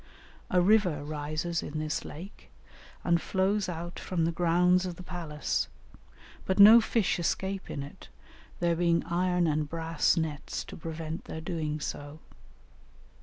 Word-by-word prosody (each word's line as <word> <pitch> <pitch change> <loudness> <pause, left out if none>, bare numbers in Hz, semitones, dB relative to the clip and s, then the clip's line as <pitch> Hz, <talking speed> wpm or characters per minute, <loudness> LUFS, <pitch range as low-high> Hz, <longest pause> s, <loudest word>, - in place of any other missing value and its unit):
A 180 - +3
river 180 -7 +3
rises 155 +3 -3
in 150 - -5
this 155 0 -2
lake 180 +7 -10 0.5
and 170 -1 +2
flows 195 +1 0
out 175 0 -6
from 170 -3 -1
the 165 - +1
grounds 180 +2 +3
of 180 -2 -4
the 180 - -10
palace, 165 -5 -2 0.8
but 190 - -1
no 215 +3 +10
fish 220 -5 +1
escape 190 +3 -2
in 140 - -4
it, 140 - -12 0.5
there 170 -1 +2
being 170 0 +2
iron 180 +1 +1
and 150 -1 0
brass 165 +1 +1
nets 155 -3 -3
to - - -10
prevent 160 0 -6
their 160 - -6
doing 160 -2 -3
so. 145 +1 -6
170 Hz, 145 wpm, -29 LUFS, 155-180 Hz, 0.8 s, no